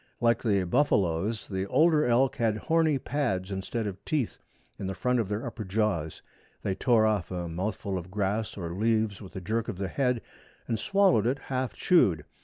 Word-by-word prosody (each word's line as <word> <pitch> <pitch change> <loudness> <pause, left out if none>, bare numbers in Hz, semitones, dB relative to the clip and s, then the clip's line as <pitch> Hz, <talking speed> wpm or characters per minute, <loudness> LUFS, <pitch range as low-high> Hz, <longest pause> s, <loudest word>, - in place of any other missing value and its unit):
Like 115 0 +3
the 100 -5 +2
buffaloes 100 - +1
the 95 -1 -3
older 155 - +4
elk 125 +2 +3
had 110 -2 +1
horny 160 +3 +2
pads 120 -9 -2
instead 100 +4 -3
of 100 -2 -6
teeth 145 -7 -1 0.4
in 95 - -3
the 95 - -3
front 125 0 +1
of 110 -4 -1
their 105 +2 -2
upper 115 - -5
jaws. 95 -6 -1 0.4
They 95 - 0
tore 115 +2 +3
off 105 -5 0
a 90 -2 -3
mouthful 95 +2 -3
of 90 +1 -10
grass 105 +3 -2
or 85 -3 -4
leaves 110 0 0
with 95 - -11
a 95 - -4
jerk 110 +5 -1
of 90 - -4
the 95 -1 -3
head 125 -2 0 0.4
and 115 - -1
swallowed 190 - +3
it 130 +3 +1
half 130 -2 -3
chewed. 90 - +3
110 Hz, 190 wpm, -28 LUFS, 95-125 Hz, 0.4 s, older